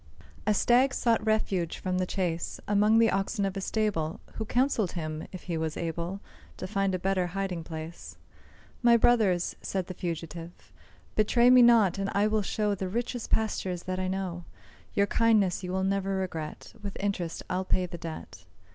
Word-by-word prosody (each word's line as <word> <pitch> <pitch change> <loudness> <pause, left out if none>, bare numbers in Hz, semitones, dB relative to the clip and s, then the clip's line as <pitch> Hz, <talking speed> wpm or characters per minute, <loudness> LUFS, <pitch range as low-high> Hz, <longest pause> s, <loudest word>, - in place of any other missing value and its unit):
A 215 - +5
Stag 255 +6 +4
sought 230 -2 +2
refuge 205 -6 0
from 185 -1 -2
the 185 - 0
chase 175 -4 -2
Among 210 +2 +4
the 225 0 +5
oxen 195 +2 0
of 195 0 -2
a 195 - -3
stable, 190 -7 -1
Who 220 - -4
counselled 240 -5 +1
him 155 -2 -4
if 185 - -8
he 170 -3 -3
was 160 -1 -2
able 170 +3 -3 0.4
To - - -5
find 195 -1 0
a - - 0
better 185 0 0
hiding 185 -4 -2
place. 160 +1 -8 0.6
"My 235 -1 +6
brothers," 215 -7 +3
said 190 -2 -2
the 185 - -6
fugitive, 170 -1 -6 0.4
"Betray 235 +3 +4
me 255 0 +8
not; 225 -6 +5
and 195 0 -1
I 200 +1 +3
will 215 0 +2
show 210 +1 0
The 190 -1 -3
richest 240 +3 -3
pastures 190 -5 -1
that 185 0 -3
I 185 - -1
know; 185 -2 -3 0.5
Your 200 - +4
kindness 210 -5 +2
you 180 - -4
will 190 0 0
ne'er 195 +1 +1 0.2
regret, 165 -3 -5
With 200 -1 -6
interest 195 -4 -2
I'll 185 +1 -1
pay 185 -1 +1
the 170 -1 -8
debt." 160 -1 -8
190 Hz, 180 wpm, -28 LUFS, 175-215 Hz, 0.6 s, me